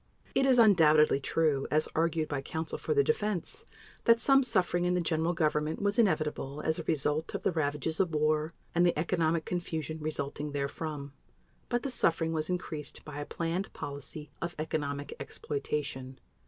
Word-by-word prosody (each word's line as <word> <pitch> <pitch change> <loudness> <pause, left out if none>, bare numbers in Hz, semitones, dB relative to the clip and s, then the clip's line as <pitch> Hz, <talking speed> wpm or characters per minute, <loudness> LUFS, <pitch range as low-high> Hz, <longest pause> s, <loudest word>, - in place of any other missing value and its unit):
It 270 - +3
is 260 -2 +5
undoubtedly 155 - +6
true, 145 -1 +1
as 155 +1 +2
argued 165 -1 +1
by 145 -2 -2
counsel 160 +4 -4
for 460 - -1
the 425 - +5
Defense, 215 - -1 0.4
that 230 0 +6
some 270 +2 +5
suffering 180 -8 +1
in 180 0 +2
the - - +2
General 165 0 +1
Government 155 -2 0
was 205 +2 +1
inevitable 150 -8 +1
as 160 +1 0
a - - -3
result 155 0 0
of - - -4
the - - +2
ravages 155 -1 -1
of 175 -5 +1
war 155 +1 +1 0.2
and 175 - +3
the 175 -3 +3
economic 165 0 +1
confusion 160 -3 -3
resulting 150 -1 -2
therefrom. 140 0 -4 0.6
But 240 0 0
the 275 - -2
suffering 165 -7 +1
was 155 0 -1
increased 160 -5 -4
by 145 -1 -7
a 145 - -5
planned 170 +3 -2
policy 145 0 -6
of 170 0 -3
economic 145 -2 -3
exploitation. 140 -2 -4
160 Hz, 165 wpm, -30 LUFS, 150-175 Hz, 0.6 s, undoubtedly